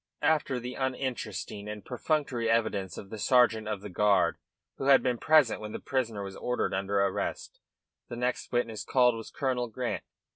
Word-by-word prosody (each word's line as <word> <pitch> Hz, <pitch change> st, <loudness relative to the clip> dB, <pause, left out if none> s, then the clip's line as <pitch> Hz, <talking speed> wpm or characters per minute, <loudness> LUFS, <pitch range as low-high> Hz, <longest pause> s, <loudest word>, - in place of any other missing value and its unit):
After 150 Hz, -5 st, +2 dB
the 125 Hz, +1 st, -6 dB
uninteresting 125 Hz, -6 st, -3 dB
and 105 Hz, -1 st, -7 dB
perfunctory 125 Hz, -3 st, -1 dB
evidence 110 Hz, -4 st, 0 dB
of 100 Hz, -, -9 dB
the 110 Hz, -, -6 dB
sergeant 115 Hz, -3 st, +4 dB
of 105 Hz, -2 st, -3 dB
the 105 Hz, -, -7 dB
guard 105 Hz, +2 st, +3 dB, 0.4 s
who 135 Hz, -, -4 dB
had 140 Hz, -1 st, +6 dB
been 125 Hz, -2 st, 0 dB
present 155 Hz, -9 st, +4 dB
when 105 Hz, 0 st, -6 dB
the -, -, -4 dB
prisoner 115 Hz, -6 st, -2 dB
was 95 Hz, -1 st, -7 dB
ordered 125 Hz, 0 st, -1 dB
under 100 Hz, +1 st, 0 dB
arrest, 100 Hz, -1 st, -2 dB, 0.5 s
the -, -, -6 dB
next 125 Hz, +1 st, -2 dB
witness 115 Hz, -3 st, -1 dB
called 125 Hz, -3 st, +4 dB
was 115 Hz, -1 st, -7 dB
Colonel 130 Hz, -3 st, -1 dB
Grant. 120 Hz, +2 st, -3 dB
120 Hz, 175 wpm, -29 LUFS, 105-130 Hz, 0.5 s, had